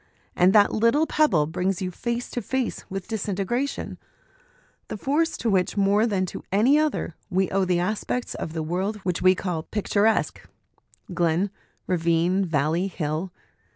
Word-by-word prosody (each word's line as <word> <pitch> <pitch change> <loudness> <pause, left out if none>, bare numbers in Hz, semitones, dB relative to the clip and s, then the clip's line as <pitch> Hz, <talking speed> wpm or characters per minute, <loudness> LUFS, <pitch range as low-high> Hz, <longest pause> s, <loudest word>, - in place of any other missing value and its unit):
And 180 +1 +5
that 205 -1 +5
little 230 +8 +3
pebble 300 - +3
brings 180 +4 -1
you 185 -1 -3
face 235 +5 -3
to 245 - -3
face 260 +2 -2
with 195 -1 -5
disintegration, 220 +5 -2 0.9
the - - -5
force 305 +8 0
to 235 - -3
which, 190 -2 +1
more 200 +3 +3
than 195 -4 0
to - - -7
any 240 +10 +4
other, 305 - -1 0.2
we 190 +1 0
owe 195 0 +2
the 180 -1 +1
aspects 215 +6 -2
of 160 - -5
the 160 -1 -2
world 185 +6 -2
which 180 -2 -1
we 185 +1 +5
call 180 -3 -3
picturesque 210 +4 0 0.7
glen, 175 +3 +1 0.3
ravine, 170 +2 +1
valley, 165 +2 0
hill. 165 0 -3
190 Hz, 155 wpm, -25 LUFS, 175-220 Hz, 0.9 s, And